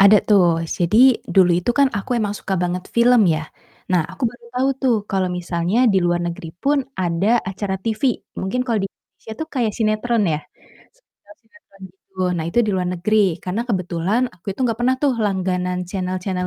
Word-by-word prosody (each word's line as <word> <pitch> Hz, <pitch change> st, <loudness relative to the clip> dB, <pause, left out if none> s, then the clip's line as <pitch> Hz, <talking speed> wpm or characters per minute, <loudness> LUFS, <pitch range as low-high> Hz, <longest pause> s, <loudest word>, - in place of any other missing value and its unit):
Ada 200 Hz, +2 st, +8 dB
tuh. 175 Hz, -5 st, +3 dB
Jadi, 225 Hz, +10 st, +4 dB
dulu 185 Hz, -2 st, +4 dB
itu 240 Hz, -, 0 dB
kan 280 Hz, -1 st, +5 dB
aku 240 Hz, +5 st, -2 dB
emang 205 Hz, -2 st, -1 dB
suka 190 Hz, -, -3 dB
banget 180 Hz, +1 st, -2 dB
film 235 Hz, -5 st, +5 dB
ya. 160 Hz, -1 st, 0 dB, 0.5 s
Nah, 175 Hz, -3 st, +4 dB
aku 190 Hz, -, -13 dB
baru 240 Hz, -1 st, -17 dB
tahu 260 Hz, +2 st, +1 dB
tuh, 250 Hz, -4 st, +3 dB
kalau 190 Hz, -1 st, 0 dB
misalnya 180 Hz, +5 st, 0 dB
di 195 Hz, -, +4 dB
luar 175 Hz, 0 st, +1 dB
negeri 170 Hz, -1 st, -6 dB
pun 285 Hz, +1 st, +2 dB, 0.2 s
ada 180 Hz, +2 st, 0 dB, 0.2 s
acara 195 Hz, 0 st, -3 dB
TV, 220 Hz, +6 st, -4 dB, 0.4 s
mungkin 190 Hz, +7 st, -2 dB
kalau 230 Hz, -3 st, +1 dB
di -, -, -3 dB
Indonesia 220 Hz, -, -14 dB
tuh 315 Hz, -, -4 dB
kayak 235 Hz, -6 st, 0 dB
sinetron 220 Hz, +1 st, +1 dB
ya, 150 Hz, -, -1 dB, 0.5 s
sekedar -, -, -22 dB
sinetron, 225 Hz, -4 st, -24 dB
gitu. 190 Hz, +1 st, -33 dB, 0.2 s
Nah, 160 Hz, -, -2 dB
itu 205 Hz, -, -1 dB
di -, -, +1 dB
luar 180 Hz, -1 st, -1 dB
negeri, 185 Hz, -1 st, +1 dB
karena 185 Hz, +5 st, -2 dB
kebetulan 185 Hz, +3 st, 0 dB
aku 175 Hz, -, -29 dB
itu 200 Hz, -, -14 dB
gak 225 Hz, -, -2 dB
pernah 255 Hz, +2 st, +2 dB
tuh 280 Hz, -, +3 dB
langganan 180 Hz, -2 st, -1 dB
channel-channel 185 Hz, 0 st, -3 dB
195 Hz, 185 wpm, -20 LUFS, 180-230 Hz, 0.5 s, Ada